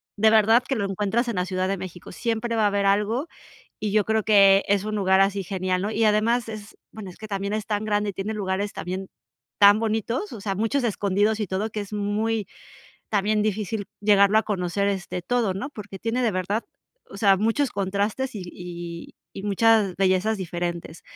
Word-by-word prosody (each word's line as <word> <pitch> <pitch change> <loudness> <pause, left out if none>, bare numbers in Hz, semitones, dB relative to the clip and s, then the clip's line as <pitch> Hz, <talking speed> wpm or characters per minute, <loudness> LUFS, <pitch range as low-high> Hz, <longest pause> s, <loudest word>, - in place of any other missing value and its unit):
de 220 +1 +4
verdad 225 +2 +5
que 270 - 0
lo 200 -4 -1
encuentras 210 +5 -1
en 235 - -2
la 180 0 0
Ciudad 185 0 -1
de 195 - -1
México. 180 -1 -9
Siempre 230 +3 -2
va 220 - +2
a 210 - +5
haber 200 0 0
algo 210 +9 +1 0.5
y 210 -1 -2
yo 210 -2 +3
creo 220 0 +1
que 195 -2 +6
es 200 0 +2
un 215 0 -3
lugar 190 -1 +3
así 195 0 +2
genial, 185 0 -1
¿no? 210 - -1
Y 220 +1 +1
además 225 +2 +2
es, 215 -2 -8 0.2
bueno, 200 -4 -8
es - - -14
que 215 - -9
también, 200 0 -3
es 215 -1 -2
tan 210 0 -1
grande 210 -1 0
y - - -9
tiene 205 +4 -4
lugares 200 0 -2
también 185 +1 -5 0.5
tan 205 +1 +7
bonitos, 225 - -2
o 220 - -7
sea, 195 -1 -2
muchos 225 +6 0
escondidos 205 0 +1
y 210 - -1
todo 195 +5 -2
que 210 - -4
es 205 +1 -8
muy 210 +1 -1 0.6
también, 210 +1 +1
difícil 210 0 -2
llegarlo 205 0 +5
a 220 - +2
conocer, 200 0 -1
este, 190 -2 -3
todo, 230 -3 0
¿no? 255 +9 -4
Porque, 205 -5 -9
tiene 235 +3 -1
de 230 - +2
verdad, 190 +4 -2 0.5
o 195 - -9
sea, 195 -2 +5
muchos 225 +7 +1
contrastes 205 +6 -2
y 195 - -5
y 175 -1 -8 0.2
y 195 - -7
muchas 205 -2 +3
bellezas 195 +3 +2
diferentes. 175 -2 -5
205 Hz, 205 wpm, -24 LUFS, 195-220 Hz, 0.6 s, tan